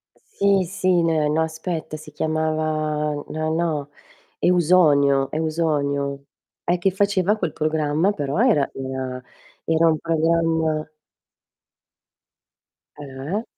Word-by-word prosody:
Sì, 200 Hz, -1 st, +1 dB
sì, 185 Hz, 0 st, +1 dB
neh 160 Hz, -2 st, +2 dB
no 155 Hz, +2 st, +1 dB
aspetta, 160 Hz, -1 st, -4 dB
si 155 Hz, 0 st, -12 dB
chiamava 155 Hz, -1 st, -1 dB
no, 155 Hz, 0 st, -2 dB
no, 160 Hz, -4 st, -1 dB, 0.5 s
Eusonio, 150 Hz, -6 st, +4 dB
Eusonio. 145 Hz, -3 st, -1 dB, 0.4 s
E 175 Hz, +1 st, +1 dB
che 190 Hz, +2 st, +1 dB
faceva 200 Hz, +1 st, +1 dB
quel -, -, -2 dB
programma, 155 Hz, +3 st, +1 dB
però 145 Hz, -2 st, -3 dB
era 220 Hz, -, +3 dB
una 130 Hz, -1 st, -5 dB, 0.4 s
era 165 Hz, +1 st, +3 dB
un 160 Hz, -, +3 dB
programma 160 Hz, -1 st, 0 dB, 2.1 s
Eh? 145 Hz, -, -5 dB
155 Hz, 100 wpm, -22 LUFS, 150-170 Hz, 2.1 s, Eusonio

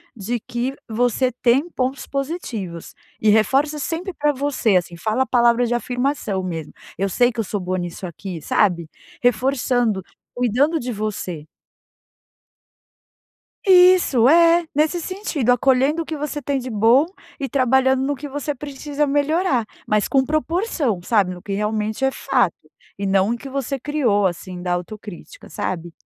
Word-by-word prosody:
de 235 Hz, +3 st, -3 dB
que 240 Hz, +4 st, -3 dB
você 245 Hz, +2 st, +1 dB
tem 265 Hz, +8 st, +3 dB
pontos 260 Hz, -2 st, -3 dB
positivos, 245 Hz, -, -5 dB, 0.3 s
e 215 Hz, -, +4 dB
reforça 270 Hz, +8 st, +3 dB
sempre 335 Hz, +6 st, -3 dB
para 295 Hz, -2 st, +1 dB
você 260 Hz, -7 st, +1 dB
assim 175 Hz, -1 st, -3 dB
fala 220 Hz, +8 st, 0 dB
a -, -, -6 dB
palavra 240 Hz, -1 st, +3 dB
de 240 Hz, -, -1 dB
afirmação 245 Hz, -5 st, -1 dB
mesmo. 165 Hz, -4 st, -5 dB, 0.3 s
"Eu 195 Hz, +1 st, 0 dB
sei 245 Hz, +6 st, +3 dB
que 230 Hz, -1 st, -3 dB
eu -, -, -2 dB
sou 205 Hz, +1 st, -3 dB
boa 185 Hz, 0 st, -2 dB
nisso 175 Hz, +1 st, -5 dB
aqui", 170 Hz, -1 st, -7 dB
sabe, 170 Hz, -2 st, +1 dB, 0.3 s
reforçando, 245 Hz, -3 st, +1 dB, 0.3 s
cuidando 255 Hz, +7 st, +1 dB
de 245 Hz, -1 st, -4 dB
você. 190 Hz, -7 st, -4 dB, 2.2 s
Isso, 360 Hz, -, +6 dB
é, 335 Hz, +3 st, +5 dB
nesse 310 Hz, +4 st, +2 dB
sentido, 335 Hz, -, -1 dB
acolhendo 265 Hz, +5 st, +3 dB
o 325 Hz, -, -5 dB
que 315 Hz, -, -5 dB
você 295 Hz, 0 st, -4 dB
tem 275 Hz, +1 st, -1 dB
de 255 Hz, 0 st, -6 dB
bom 230 Hz, +7 st, +4 dB, 0.3 s
e 275 Hz, -, -2 dB
trabalhando 265 Hz, 0 st, +2 dB
no 285 Hz, +2 st, 0 dB
que 285 Hz, +2 st, -7 dB
você 290 Hz, +1 st, -3 dB
precisa 290 Hz, +1 st, -3 dB
melhorar, 290 Hz, -2 st, +1 dB, 0.2 s
mas 210 Hz, -1 st, +2 dB
com 270 Hz, -2 st, +3 dB
proporção, 310 Hz, -, -1 dB
sabe 190 Hz, -2 st, +1 dB
no 180 Hz, -, -11 dB
que 200 Hz, -, -5 dB
realmente 215 Hz, +3 st, -2 dB
é 270 Hz, -, +3 dB
fato, 250 Hz, -11 st, +1 dB, 0.5 s
e 200 Hz, -, -2 dB
não 195 Hz, +3 st, +2 dB
o 240 Hz, -, -1 dB
que 275 Hz, -, -10 dB
você 275 Hz, 0 st, -3 dB
criou 240 Hz, -9 st, +1 dB
assim 180 Hz, 0 st, -6 dB
da 180 Hz, -1 st, -1 dB
autocrítica, 205 Hz, -, -7 dB
sabe. 170 Hz, -2 st, -4 dB
245 Hz, 155 wpm, -21 LUFS, 210-285 Hz, 2.2 s, Isso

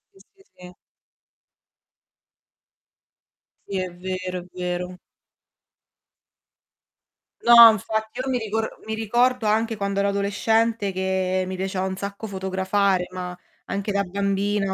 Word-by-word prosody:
S 195 Hz, -, -19 dB
sì, 390 Hz, -, -23 dB
sì. 180 Hz, 0 st, -12 dB, 2.9 s
Sì, 195 Hz, -, -3 dB
è 185 Hz, -1 st, -2 dB
vero, 185 Hz, 0 st, -4 dB
è -, -, -12 dB
vero. 180 Hz, 0 st, -4 dB, 2.4 s
No, 235 Hz, -1 st, +10 dB
infatti, 220 Hz, +2 st, -3 dB
io 255 Hz, -, -3 dB
mi 255 Hz, -, +1 dB
rico 220 Hz, -1 st, -2 dB, 0.3 s
mi 220 Hz, -, -4 dB
ricordo 240 Hz, +2 st, +1 dB
anche 225 Hz, +1 st, +1 dB
quando 200 Hz, -1 st, -1 dB
ero 200 Hz, 0 st, +2 dB
adolescente 205 Hz, +2 st, +1 dB
che 185 Hz, 0 st, -1 dB
mi 185 Hz, -, -4 dB
piaceva 190 Hz, 0 st, -2 dB
un 190 Hz, -, -3 dB
sacco 200 Hz, +3 st, -6 dB
fotografare, 190 Hz, -1 st, 0 dB
ma 180 Hz, -1 st, -6 dB, 0.3 s
anche 200 Hz, +1 st, -3 dB
da 200 Hz, 0 st, +1 dB
bambina 200 Hz, +1 st, -1 dB
200 Hz, 120 wpm, -23 LUFS, 185-220 Hz, 2.9 s, No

